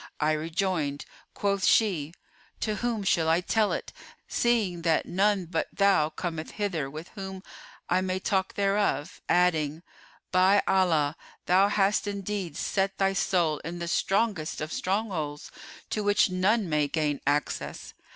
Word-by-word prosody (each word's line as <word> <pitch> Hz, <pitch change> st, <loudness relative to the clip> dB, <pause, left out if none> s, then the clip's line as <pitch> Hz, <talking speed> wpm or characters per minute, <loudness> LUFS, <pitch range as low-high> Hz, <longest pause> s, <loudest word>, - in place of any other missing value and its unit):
"I 150 Hz, 0 st, +2 dB
rejoined," 160 Hz, -2 st, -1 dB, 0.3 s
quoth 200 Hz, -1 st, 0 dB
she, 175 Hz, -8 st, +2 dB, 0.4 s
"'To 215 Hz, -1 st, -1 dB
whom 230 Hz, -1 st, -1 dB
should 165 Hz, -4 st, +2 dB
I 165 Hz, +1 st, +4 dB
tell 210 Hz, +3 st, +1 dB
it, -, -, -4 dB, 0.3 s
seeing 215 Hz, -8 st, +1 dB
that 165 Hz, -1 st, +2 dB
none 195 Hz, 0 st, +1 dB
but 170 Hz, -, -2 dB
thou 195 Hz, -6 st, +3 dB
cometh 160 Hz, 0 st, -5 dB
hither 175 Hz, -10 st, -1 dB
with 155 Hz, +4 st, -8 dB
whom 190 Hz, -1 st, -7 dB, 0.4 s
I 185 Hz, -, +2 dB
may 185 Hz, 0 st, -1 dB
talk 190 Hz, -1 st, -1 dB
thereof?' 195 Hz, -6 st, 0 dB
adding, 165 Hz, -3 st, +2 dB, 0.5 s
'By 190 Hz, +2 st, +4 dB
Allah, 165 Hz, -6 st, +2 dB, 0.3 s
thou 190 Hz, +3 st, +5 dB
hast 205 Hz, +1 st, +1 dB
indeed 200 Hz, -5 st, -4 dB
set 195 Hz, 0 st, -1 dB
thy 195 Hz, 0 st, +2 dB
soul 175 Hz, -5 st, +1 dB
in 170 Hz, +2 st, -6 dB
the 170 Hz, 0 st, -4 dB
strongest 195 Hz, -2 st, 0 dB
of 155 Hz, +1 st, -4 dB
strongholds 185 Hz, -7 st, -2 dB, 0.4 s
to 215 Hz, -, -1 dB
which 205 Hz, -1 st, +3 dB
none 195 Hz, +3 st, +2 dB
may 150 Hz, -2 st, +1 dB
gain 150 Hz, -1 st, -1 dB
access! 145 Hz, +1 st, -2 dB
185 Hz, 140 wpm, -27 LUFS, 160-200 Hz, 0.5 s, thou